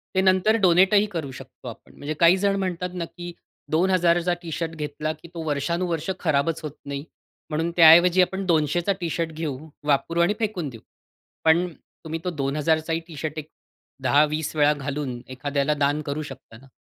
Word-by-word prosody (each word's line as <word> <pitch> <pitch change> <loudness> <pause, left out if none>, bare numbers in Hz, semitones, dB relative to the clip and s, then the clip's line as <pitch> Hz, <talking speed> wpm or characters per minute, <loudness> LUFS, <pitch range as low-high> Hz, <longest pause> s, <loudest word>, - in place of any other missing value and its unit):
ते 190 - +4
नंतर 190 +3 +3
डोनेटही 190 +3 +5
करू 155 -5 -4
शकतो 130 - -12
आपण. - - -11
म्हणजे 145 +2 -4
काही 170 +2 +6
जण 200 +1 +1
म्हणतात 180 -1 -2
ना 175 -2 -3
की 175 +1 -9 0.4
2000चा 175 0 +2
टी-शर्ट 165 -1 -4
घेतला 150 0 -3
की 155 +2 -15
तो 165 -1 -5
वर्षानुवर्ष 170 +4 -1
खराबच 155 0 0
होत 155 - -4
नाही, 140 0 -5 0.5
म्हणून 160 +2 -1
त्याऐवजी 175 +2 +8
आपण 190 +2 -1
200चा 170 +2 +1
टी-शर्ट 165 -1 -2
घेऊ, 155 -4 -4 0.3
वापरू 150 +3 +1
आणि 175 +4 +3
फेकून 200 -9 -2
देऊ. 115 -4 -12 0.6
पण 165 +3 +4 0.4
तुम्ही 160 0 -4
तो 180 - -1
2000चा 155 +2 0
ही 165 - 0
टी-शर्ट 155 -1 -6
एक 155 +1 -10 0.5
10-20 150 +3 +2
वेळा 150 0 +4
घालून, 140 -3 -4
एखाद्याला 140 +3 -1
दान 145 +1 0
करू 145 +1 -4
शकत 135 -4 -11
ना. 135 - -17
160 Hz, 165 wpm, -24 LUFS, 145-175 Hz, 0.6 s, त्याऐवजी